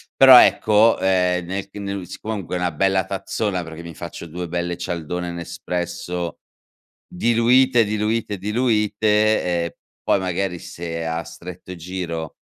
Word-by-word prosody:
Però 130 -2 +10
ecco, 110 +1 +4
ehm, 90 -2 +1
nel 95 +2 -4
che 105 - -10
nel 100 -2 -4
si - - -8
comunque 105 -5 -4
una 90 -1 -1
bella 95 +3 +2
tazzona, 95 0 -2
perché 80 0 -9
mi 85 -2 -9
faccio 85 +1 -8
2 90 +2 -5
belle 85 0 -3
cialdone 85 0 -4
Nespresso, 85 0 -4 0.7
diluite 120 +4 +3
diluite 105 0 -1
diluite, 105 0 +2 0.2
ehm, - - -3 0.3
poi - - +2
magari 90 -1 -2
se 85 -1 -6
a 80 +1 -2
stretto 90 +2 -10
giro 85 -2 -5
90 Hz, 135 wpm, -21 LUFS, 85-105 Hz, 0.7 s, Però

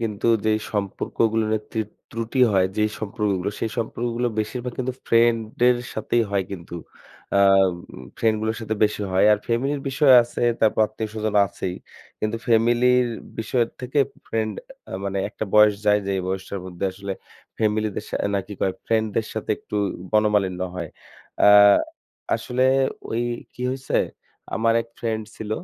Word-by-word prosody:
কিন্তু 110 -2 -2 0.2
যেই 110 0 +3
সম্পর্কগুলোর 110 +2 0 0.2
ত্রি 110 - -1 0.3
ত্রুটি 115 +3 -2
হয়, 95 -2 +4
যেই 105 0 +2
সম্পর্কগুলো 105 -3 -1
সেই 115 - -1
সম্পর্কগুলো 120 +1 -2
বেশিরভাগ 125 +3 -4
কিন্তু 130 0 -1
friend 115 0 +4 0.3
এর 125 - +4 0.2
সাথেই 115 +2 +1
হয় 100 -1 +1
কিন্তু। 85 -3 -8 0.6
আ - - +5 0.8
friend 110 -1 +3
গুলোর 110 +1 -1
সাথে 110 -1 -2
বেশি 105 0 -1
হয়। 95 - +4
আর 105 - +2
family 120 +4 0
র - - -9
বিষয় 135 0 +5
আছে, 120 - -6 0.2
তারপর 110 0 +3
আত্মীয়স্বজন 110 -1 -4
আছেই। 95 -2 -5 0.5
কিন্তু 110 +1 -1
family 120 +1 +3 0.2
র - - -3 0.3
বিষয় 115 +2 +1 0.2
থেকে 130 +3 -2 0.3
friend 110 -1 -1 0.4
আ - - -7
মানে 100 0 -2
একটা 110 - -5
বয়স 105 -1 +7
যায় 105 0 +5
যেই 95 -1 0
বয়সটার 95 +1 -4
মধ্যে 90 +1 -5
আসলে 100 +1 -5 0.5
family 110 0 +1
দের - - -4
সা - - -2
অ্যা - - 0
নাকি 100 +1 -4
কয় 95 - +1
friend 110 -1 +2
দের 110 - +1
সাথে 110 - -4
একটু - - -6 0.4
মনমালিন্য 105 -4 +2 0.2
হয়। 85 -3 -4 0.6
আ - - +9 0.9
আসলে 125 +1 -1 0.5
ওই 115 +1 0 0.3
কি 125 - -7
হইছে, 135 0 -2 0.6
আমার 115 0 +2
এক - - -19
friend 110 -2 -2
ছিল 110 -1 -7
110 Hz, 155 wpm, -23 LUFS, 105-115 Hz, 0.9 s, আ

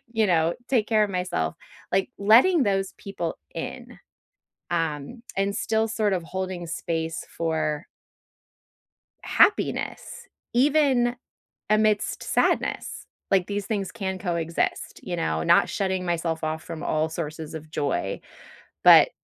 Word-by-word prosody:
you 220 -2 +2
know, 165 -2 +2
take 230 -5 +2
care 215 -2 +4
of 200 - -4
myself. 180 - -1 0.4
Like, 190 0 +2
letting 245 - +6
those 195 -3 0
people 175 -4 -4 0.2
in, - - -7 0.7
um, 165 - -2 0.2
and 200 +1 +1
still 220 0 +1
sort 215 -3 +1
of 175 -2 -1
holding 185 -1 -4
space 165 0 -3
for 155 -2 -1 1.4
happiness - - +1 0.3
even 260 -2 +3 0.5
amidst 215 -1 +2
sadness. - - 0 0.2
Like, 190 -2 +3
these 205 -1 -3
things 200 -4 -2
can 190 -4 -3
coexist, 170 -3 -2
you - - -3
know? 80 0 -1
Not - - +4
shutting 190 -2 -1
myself 165 -2 -1
off 155 0 -2
from 165 0 -7
all 155 -1 +1
sources 160 -1 -5
of 155 -1 -8
joy, 140 -10 -1 0.6
but - - +8
185 Hz, 125 wpm, -25 LUFS, 160-215 Hz, 1.4 s, but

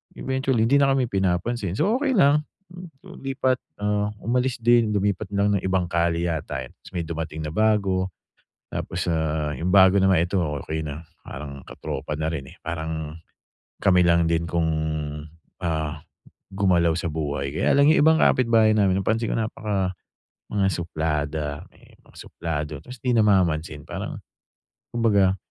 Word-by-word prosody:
eventually, 130 -3 0
hindi 140 - +3
na 135 -1 +4
kami 130 -3 +1
pinapansin. 95 +1 -1
So, 205 - +2
okey 285 -2 +1
lang. 150 -2 +5 0.3
Hmm, 180 0 -9
so - - -13
lipat, 135 -1 0 0.2
ah, 105 0 0
umalis 125 +1 0
din, 115 -1 +4
lumipat 100 0 -1
lang 100 0 +2
ng 95 - 0
ibang 95 -2 0
kalye 85 0 0
yata, 75 -5 -3
eh, 60 - -12
ta's - - -17
may 85 - -1
dumating 80 -1 -5
na - - -3
bago. 95 -2 +1 0.6
Tapos, 90 +1 -3
ah, 80 -2 -1
yung 90 +2 -2
bago 95 -1 +7
na 95 0 +4
naman, 85 -1 +3
ito 100 - -4 0.3
okey 80 0 -3
na, 75 +2 -6 0.2
parang 70 -1 -8
ka-tropa 75 - -5
na 80 - -1
rin, 70 -5 -6
eh, - - -15
parang 80 -1 -4 0.7
kami 90 -2 +4
lang 85 -1 +3
din 85 0 +1
kung, 85 -1 0 1.0
ah, 80 -2 -2 0.5
gumalaw 90 -4 +3
sa 90 - -4
buhay. 70 -3 -3
Kaya - - +2
lang, 140 - +6
yung - - +4
ibang 160 +1 +5
kapitbahay 115 -3 +4
namin 95 -2 +3
napansin 110 +3 0
ko - - -1
napaka 105 -4 -2 0.6
mga 100 -2 +1
suplada, 75 -4 -2
ayan, - - -21
yung - - -29
may - - -21
mga - - -17
suplado 75 -3 -4
ta's 125 0 -9
di 125 -1 +1
namamansin. 85 -8 +2
Parang - - -6 0.7
kumbaga 100 -5 +3
95 Hz, 165 wpm, -24 LUFS, 80-110 Hz, 1.0 s, bago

